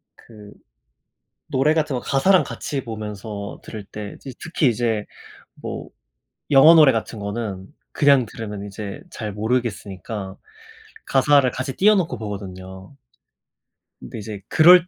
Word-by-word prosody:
그 105 -3 -14 1.0
노래 145 +2 +2
같은 150 -3 0
거 - - -2
가사랑 180 +10 +3
같이 140 -2 -4
보면서 105 -2 -6
들을 105 -3 -8
때 105 0 -7
그 135 - -7
특히 160 -4 +1
이제 115 -3 0 0.5
뭐 - - -7 0.6
영어 145 +4 +9
노래 155 -4 +8
같은 115 -1 -3
거는 100 -2 -5 0.2
그냥 140 -4 +5
들으면 105 -2 -7
이제 100 0 -7
잘 105 -3 -5
모르겠으니까, 105 -3 -3 0.7
가사를 135 -1 +4
같이 130 +1 -4
띄워 210 +2 +5
놓고 165 - 0
보거든요. 95 0 -8 1.1
근데 - - -8
이제 105 -1 -7
그럴 175 +2 +7
115 Hz, 260 characters per minute, -22 LUFS, 100-140 Hz, 1.1 s, 영어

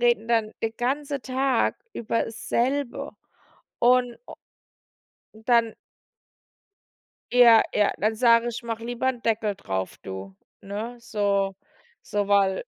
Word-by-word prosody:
reden 235 -2 +2
dann 225 -2 +1
den 225 - -1
ganze 280 +3 -1
Tag 260 -1 0 0.2
über 230 0 -1
dasselbe 240 +4 -2 0.7
und 245 0 +3
o - - -10 1.0
dann 230 0 +1 1.6
ja, 240 -2 +7
ja, 210 -1 +3
dann 215 +2 +1
sage 230 +1 +4
ich: 235 0 -5
„Mach 230 -1 -4
lieber 240 +2 -2
'n 245 -3 -3
Deckel 220 -2 0
drauf, 95 - -4
du, 95 0 -8 0.3
ne?“ 215 +5 -6
So 200 -4 0 0.5
so, 205 -1 -2
weil 200 - +2
230 Hz, 115 wpm, -25 LUFS, 210-245 Hz, 1.6 s, ja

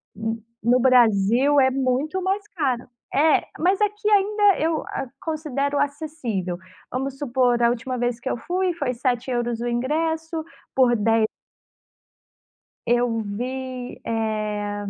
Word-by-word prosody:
no 225 +2 -3 0.2
no 245 +2 +4
Brasil 245 +2 +4
é 260 0 +4
muito 270 +7 0
mais 395 +3 -1
caro, 265 -9 -1 0.3
é 305 +2 +4 0.2
mas 375 +5 +2
aqui, 420 +1 0
ainda 410 -1 +4
eu 320 0 0
a 270 - -4
considero 290 -3 -2
acessível, 280 - -2 0.3
vamos 270 +1 -3
supor 250 -3 +1
a 235 - +5
última 245 +2 -2
vez 245 -1 -1
que 260 - -4
eu - - -1
fui, 360 +6 -1
foi 280 -6 -1
€7 240 -1 -1
o 240 - -2
ingresso, 320 +6 -1 0.3
por 250 -2 +4
de 225 +1 +3 1.6
Eu 240 -1 +2
vi, 250 +4 -5
eh, 210 -2 -2
255 Hz, 130 wpm, -23 LUFS, 235-310 Hz, 1.6 s, a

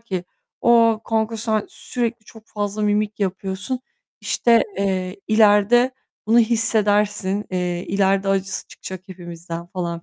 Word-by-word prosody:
ki 190 -6 -4 0.4
"A, 230 -2 +5
kanka 220 0 -1
sen 220 -1 -1
sürekli 235 -2 -4
çok 220 0 -16
fazla 205 0 -3
mimik 210 0 0
yapıyorsun, 195 +5 -3 0.4
işte, 235 -1 +3 0.2
eee, 190 -1 -1
ileride 215 +3 +5 0.4
bunu 230 +2 +5
hissedersin, 210 -3 +2
eee, 180 -1 -2
ileride 195 0 +1
acısı 195 0 -1
çıkacak 185 -1 -8
hepimizden." 170 -1 -8
falan, 170 -2 -4
205 Hz, 120 wpm, -21 LUFS, 190-225 Hz, 0.4 s, A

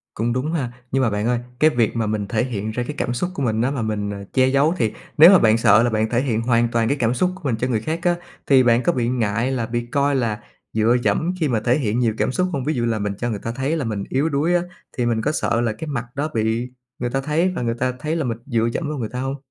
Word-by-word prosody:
Cũng 115 +2 -1
đúng 130 +5 -1
ha! 130 -7 -2 0.2
Nhưng 135 0 +2
mà 115 - +3
bạn 105 +1 -2
ơi, 120 -1 +1 0.2
cái 155 - +6
việc 120 -7 0
mà 115 -2 0
mình 105 -1 -2
thể 110 +3 0
hiện 110 -4 -3
ra 125 +2 -2
cái 150 - -5
cảm 120 - -1
xúc 175 +9 -2
của 140 - -5
mình 110 -2 0
á, 130 +3 +1
mà 135 -5 -2
mình 105 -2 -2 0.2
che 130 -1 +4
giấu 140 +5 +3
thì 110 -6 +1 0.3
nếu 160 +4 +10
mà 190 - +7
bạn 110 0 +4
sợ 110 0 +5
là 120 - +2
bạn 110 0 0
thể 120 +1 +1
hiện 115 -5 0
hoàn 120 0 +2
toàn 115 -1 +1
cái 140 - 0
cảm 120 -2 +1
xúc 180 +9 +1
của 185 - -14
mình 125 -5 0
cho 125 +3 -2
người 110 -4 0
khác 160 +6 -2
á 175 -1 +3 0.3
thì 135 -2 +6
bạn 120 0 +3
có 175 - +3
bị 120 -2 0
ngại 115 0 0
là 120 -4 -1
bị 120 +1 -3
coi 140 +3 +1
là 115 -5 -1 0.3
dựa 110 +2 +3
dẫm 175 +3 +1
khi 155 - +1
mà 120 -5 +1
thể 125 +5 +2
hiện 115 -3 -1
nhiều 115 -3 +2
cảm - - 0
xúc 180 +6 0
hông? 135 - -2
Ví 150 +4 0
dụ 120 -5 -1
là 115 -2 0
mình 100 -1 -2
cho 120 - -1
người 105 -3 -3
ta 115 - -4
thấy 135 +6 -1
là 140 - -2
mình 105 -3 -3
yếu 140 +5 +1
đuối 160 +4 +1
á, 175 - +3 0.4
thì 120 - +1
mình 115 -2 +1
có - - 0
sợ 120 -5 0
là 115 -2 0
cái 160 +8 -7
mặt 125 -4 -3
đó 145 +3 -1
bị 115 +2 0 0.3
người 120 - -1
ta 135 +2 -1
thấy 155 +6 +1
và - - -2
người 115 -1 -1
ta 130 0 +1
thấy 155 +1 -2
là 160 - -1
mình 115 -2 -2
dựa 115 -4 0
dẫm 165 - -2
vào 150 - -3
người 115 -4 -3
ta 125 - -5
hông? 135 +1 -3
120 Hz, 310 wpm, -21 LUFS, 115-140 Hz, 0.4 s, nếu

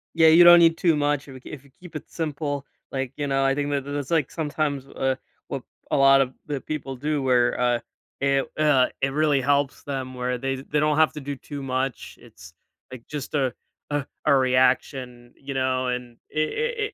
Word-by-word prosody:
Yeah, 160 -1 +6
you 165 +2 +8
don't 175 0 +9
need 165 -1 +5
too 170 -4 +3
much 145 -1 0
if 135 - -10
you 130 - -10
kee - - -12
if 140 -3 -9
you 140 - -21
keep 175 -3 -13
it 155 - -7
simple. 145 -3 -3 0.3
Like, 135 -1 -3
you 145 - -2
know, 135 0 +1
I 135 0 +2
think 145 0 -2
that 140 -1 0
that's, 145 +1 -5
like, 160 -5 +2
sometimes, 150 -3 -2
uh, 135 -1 -1 0.3
what - - -5 0.3
a - - +1
lot 135 0 +6
of 130 -1 -1
the 145 -3 -4
people 135 -3 -5
do 145 +1 -2
where, 125 -2 +2
uh, 120 -1 +2 0.4
it, 135 0 +2
uh, 145 -4 +4
it 135 - +2
really 145 -1 +2
helps 140 +1 0
them 130 -2 -4
where 125 0 -2
they 135 +1 -2
they 145 +3 -2
don't 150 0 +2
have 160 0 +4
to 150 - -7
do 140 +1 -5
too 140 +1 -8
much. 130 0 -3
It's, 90 -8 -15 0.4
like, 125 -2 -10
just 150 -1 -6
a 130 -4 +1 0.4
a 145 -2 -1 0.2
a 145 - +5
reaction, 125 -1 +1
you 140 0 -7
know, 130 -1 0
and 125 -1 -4
it 425 - -2
140 Hz, 210 wpm, -24 LUFS, 130-150 Hz, 0.4 s, don't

